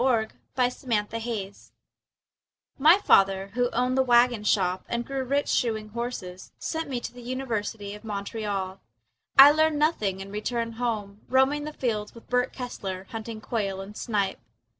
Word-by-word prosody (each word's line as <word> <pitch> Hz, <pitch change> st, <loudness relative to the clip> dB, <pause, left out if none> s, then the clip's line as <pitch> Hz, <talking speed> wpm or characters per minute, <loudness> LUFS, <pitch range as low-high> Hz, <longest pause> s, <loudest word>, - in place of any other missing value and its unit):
Percy 235 Hz, -4 st, +2 dB, 0.6 s
Bysshe 220 Hz, -1 st, 0 dB
Shelley 215 Hz, -4 st, -4 dB, 1.3 s
My 315 Hz, +6 st, +7 dB
father 195 Hz, -, +3 dB
who 245 Hz, +1 st, +1 dB
owned 250 Hz, +2 st, 0 dB
the 265 Hz, -, +4 dB
wagon 240 Hz, -3 st, +4 dB
shop 185 Hz, -3 st, +1 dB
And 235 Hz, 0 st, -2 dB
grew 270 Hz, 0 st, -3 dB
rich 280 Hz, +3 st, 0 dB
shoeing 220 Hz, -3 st, 0 dB
horses 210 Hz, -6 st, -6 dB
Sent 320 Hz, -2 st, -3 dB
me 255 Hz, -3 st, -2 dB
to -, -, -7 dB
the 245 Hz, -, -11 dB
University 225 Hz, -5 st, -3 dB
of 210 Hz, -, -11 dB
Montreal. 200 Hz, -2 st, -3 dB, 0.6 s
I 275 Hz, +2 st, +11 dB
learned 315 Hz, 0 st, +2 dB
nothing 215 Hz, -, +1 dB
and 195 Hz, +1 st, -8 dB
returned 230 Hz, +2 st, -2 dB
home, 210 Hz, -4 st, -2 dB
Roaming 265 Hz, +3 st, +3 dB
the 305 Hz, -, -4 dB
fields 215 Hz, -6 st, -2 dB
with 230 Hz, -, -14 dB
Bert 250 Hz, +1 st, +2 dB
Kessler, 195 Hz, -7 st, -5 dB
Hunting 225 Hz, -1 st, -6 dB
quail 200 Hz, -4 st, -2 dB
and 195 Hz, +2 st, -8 dB
snipe. 205 Hz, -5 st, -1 dB
230 Hz, 155 wpm, -26 LUFS, 205-250 Hz, 1.3 s, I